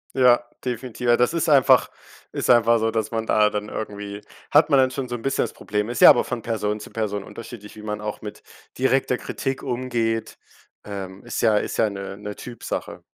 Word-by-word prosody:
Ja, 125 -2 +5 0.2
definitiv. 125 0 -4
Ja, 120 - +5
das 125 +6 +2
ist 170 -1 0
einfach 140 -3 +5 0.4
ist - - -3
einfach 115 -1 +5
so, 115 0 +1
dass 110 0 -2
man 115 -1 -2
da 105 -1 +4
dann 105 0 -4
irgendwie 105 -1 -6 0.3
hat 150 +2 +5
man 140 -3 +5
dann 130 0 +4
schon 130 -1 -4
so 120 - -4
'n 115 - -7
bisschen 135 - 0
das - - -5
Problem. 105 +1 -3
Ist 120 - -3
ja - - +11
aber - - +6
von 125 -2 -4
Person 105 -2 -2
zu 105 - -10
Person 105 -3 -2
unterschiedlich, 115 -2 -10
wie 105 - -11
man 105 0 -4
auch 105 0 -5
mit 105 -1 -8 0.4
direkter 130 0 +2
Kritik 135 +3 -4
umgeht, 120 -3 -2 0.5
ähm, 95 -2 -7
ist - - -3
ja 110 -2 +4
ist - - -2
ja 110 - +3
'ne 100 -1 -7
'ne 105 0 -7
Typsache. 120 -2 -6
115 Hz, 210 wpm, -23 LUFS, 105-125 Hz, 0.5 s, ja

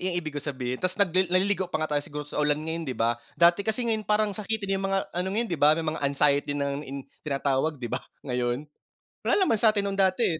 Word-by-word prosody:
yung 185 -1 -1
ibig 155 -4 -3
ko 145 - -4
sabihin 130 -3 -4
tas 185 0 0
nagli 185 -2 +2
naliligo 185 0 +1
pa - - -1
nga 155 - -4
tayo 145 - +2
siguro 150 +1 -6
sa 145 - -3
ulan 150 0 +3
ngayon 160 -1 -3
di 125 - -3
ba? 115 +1 +1 0.2
Dati 170 +2 +5
kasi 220 +4 -1
ngayon 220 -3 -1
parang 210 -1 +2
sakitin 200 -2 -2
yung 195 - -1
mga 195 0 +2
ano 180 +2 -1
ngayon 220 +5 0
di 160 - -2
ba, 150 +1 +6
may 165 - -2
mga 160 +1 -2
anxiety 145 0 +2
in - - -2
na 140 - -1 0.5
tinatawag 140 +1 0
di 120 -3 -6
ba, 125 - -1 0.2
ngayon? 125 0 -1 0.6
Wala - - +5
naman 225 - +1
satin 215 -3 +4
nung 200 0 -3
dati 190 +4 +3
165 Hz, 235 wpm, -27 LUFS, 145-195 Hz, 0.6 s, ba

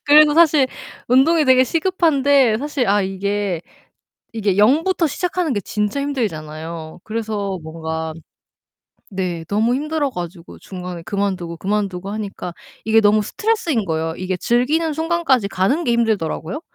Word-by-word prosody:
그래서 295 0 +7
사실 310 -4 +5 0.4
운동이 300 +6 +4
되게 260 -1 +5
시급한데 285 -7 +2
사실 280 -3 -1
아 205 +1 +3
이게 195 -1 -2 0.7
이게 205 -4 -1
0 255 +10 +4
부터 370 -3 +1
시작하는 350 -1 -1
게 205 - 0
진짜 210 +7 -2
힘들잖아요. 160 - -4
그래서 215 -3 -3
뭔가 160 0 -4 1.0
네. 180 -4 -3
너무 220 +4 +1
힘들어 300 +1 -1
가지고 175 -5 -8
중간에 180 -2 -8
그만두고, 195 -5 -2
그만두고 195 -1 -2
하니까 200 -4 -5 0.3
이게 220 0 +4
너무 210 0 +4
스트레스인 330 - -1
거예요. 160 -1 -2
이게 185 0 -2
즐기는 285 - +1
순간까지 320 -8 +1
가는 200 - +1
게 245 - +1
힘들더라고요. 220 - -1
215 Hz, 335 characters per minute, -20 LUFS, 185-285 Hz, 1.0 s, 그래서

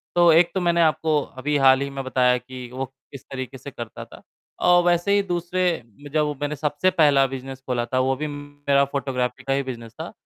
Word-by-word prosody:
तो 175 -1 +6
एक 170 +1 +5
तो 190 - -1
मैंने 170 -1 +2
आपको 155 -1 +2 0.2
अभी 150 +1 0
हाल 135 0 +5
ही 140 - -2
में 135 -1 -5
बताया 125 -1 +2
कि 125 0 -9
वो 135 +1 -3
किस 135 +1 -15
तरीके 130 -1 -6
से 135 +2 -9
करता 115 -4 -8
था, - - -15 0.4
और 175 0 +5
वैसे 175 +3 +2
ही 205 - +4
दूसरे 175 -2 -1 0.2
में 145 - -10
जब 155 0 +2
वो 150 -1 -3
मैंने 145 +1 -2
सबसे 150 +5 +1
पहला 145 -6 +4
बिज़नेस 135 0 -7
खोला 120 -2 0
था, 130 +2 -1
वो 130 +1 +1
भी 150 +3 -3
मेरा 145 -1 0
फ़ोटोग्राफ़ी 130 -3 -3
का 135 - 0
ही 140 0 0
फ़ोटोग्राफ़ी 120 -3 -8
था। 165 +5 -6
140 Hz, 220 wpm, -23 LUFS, 130-160 Hz, 0.4 s, तो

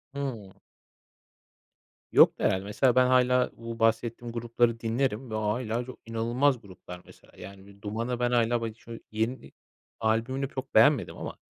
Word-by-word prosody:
Hımm. 120 -9 -5 1.6
Yoktu - - +5
herhâlde. 95 0 +1
Mesela 120 +5 +1
ben 130 0 +5
hâlâ 125 0 +3
bu 115 0 -7
bahsettiğim 115 +1 0
grupları 115 0 0
dinlerim 120 +1 -1
ve 110 - -2
o 110 - -1
hâlâ 120 0 -3
çok 130 - -10
inanılmaz 120 +3 0
gruplar 90 -2 -11
mesela, - - -19
yani, 100 0 -11
bir 100 0 -17
Duman'a 115 +4 -3
ben 120 0 +1
hâlâ 120 -1 +2
badi 110 -1 -4
şöy 115 -1 -10
yeni 110 +4 -3 0.5
albümünü 115 +5 0
çok 130 - -7
beğenmedim 115 - +4
ama, - - -7
115 Hz, 150 wpm, -28 LUFS, 110-125 Hz, 1.6 s, Yoktu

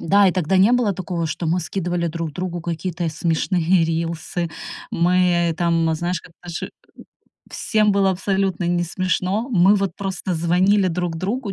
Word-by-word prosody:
Да, 200 +4 +4
и 180 - +1
тогда 185 0 +1
не 195 +5 +5
было 245 -5 +2
такого, 175 -2 -3
что 160 +2 -3
мы 170 +3 +1
скидывали 175 -1 -2
друг 165 -1 -4
другу 180 0 -4
какие-то 170 0 -3
смешные 170 +2 +1
рилсы. 165 +1 -2 0.4
Мы 175 -1 +2
там, 165 -2 +1
знаешь, 175 +2 -2
как 175 - -17
наши 175 -1 -5 0.8
всем 215 -2 +1
было 195 -1 +3
абсолютно 190 0 -1
не 175 0 +1
смешно. 185 +5 -1
Мы 195 -2 +5
вот 195 -3 -1
просто 190 -2 -3
звонили 185 +4 +3
друг 175 -1 -2
другу, 200 +5 -3
175 Hz, 155 wpm, -21 LUFS, 170-190 Hz, 0.8 s, не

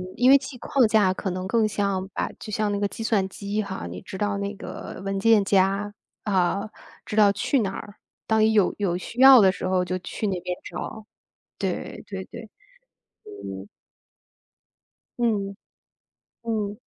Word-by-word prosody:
因 250 +2 +5
为 275 - +9
记 260 -1 -8
框 255 0 +2
架 210 -4 +3
可 190 - -4
能 185 0 -4
更 225 +1 +2
像 200 -2 -1
把 - - -2
就 215 - -8
像 210 0 0
那 200 - -1
个 205 - +1
计 225 +3 -7
算 210 -4 +1
机 200 +2 -3
哈， 195 - -5
你 90 +1 -7
知 190 - -8
道 205 0 -1
那 200 +1 -3
个 - - -8
文 195 0 -1
件 215 -1 +4
夹， 195 +1 +2 0.3
呃， 195 +1 +1 0.4
知 - - -5
道 210 -2 +6
去 205 +7 +1
哪 195 -4 -1
儿， 205 +1 -8 0.3
当 220 0 +2
你 220 0 +4
有 205 -4 +3
有 180 -4 0
需 235 +7 -5
要 265 -1 +10
的 195 -3 +6
时 185 - -4
候 185 -1 +1
就 185 0 -2
去 185 +4 -5
那 190 -3 -1
边 180 0 -4
找。 210 +5 -7 0.5
对， - - -4
对 - - -6
对。 - - -9 0.8
嗯。 100 -1 -8 1.5
嗯， 205 -4 0 0.9
嗯。 215 -3 -2
200 Hz, 185 characters per minute, -25 LUFS, 190-220 Hz, 1.5 s, 要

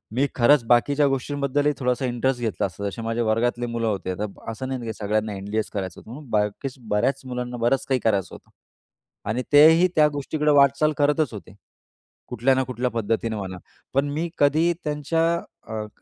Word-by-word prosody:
मी 135 +3 +2
खरंच 130 +2 +5
बाकीच्या 140 +5 +3
गोष्टींबद्दलही 140 +1 0
थोडासा 125 0 0
इंटरेस्ट 125 +1 -1
घेतला 115 -3 -1
असता, 95 +1 -6
जसे 115 - -8
माझ्या 115 +1 -1
वर्गातले 120 +2 0
मुलं 115 -1 -2
होते 95 -3 -2
तर 105 - 0 0.3
असं 120 +4 -6
नाही 130 -1 -3
की 115 -1 -4
सगळ्यांना 105 0 -1
एम-बी-एच 105 +3 -3
करायचं 95 -3 -4
होतं, 110 - -13
म्हणून 140 +1 -10
बाकीच 105 +5 -1 0.2
बऱ्याच 105 +6 +1
मुलांना 125 -1 -4
बरंच 120 +3 +1
काही 130 -1 +2
करायचं 100 -5 0
होतं - - -16 0.8
आणि 115 +4 0
तेही 160 +5 +7
त्या 150 -1 +6
गोष्टीकडे 150 +1 0
वाटचाल 140 +1 +4
करतच 145 -2 +1
होते. 100 -2 -10 0.7
कुठल्या 130 +4 +1
ना 130 - +1
कुठल्या 125 0 -2
पद्धतीने 115 0 -1
म्हणा. 95 -3 -5 0.4
पण 140 +2 +1
मी 160 +4 -2
कधी 155 +4 +3
त्यांच्या 150 +2 0 0.4
अ, 110 - -7 0.2
क - - -33
125 Hz, 175 wpm, -24 LUFS, 110-145 Hz, 0.8 s, तेही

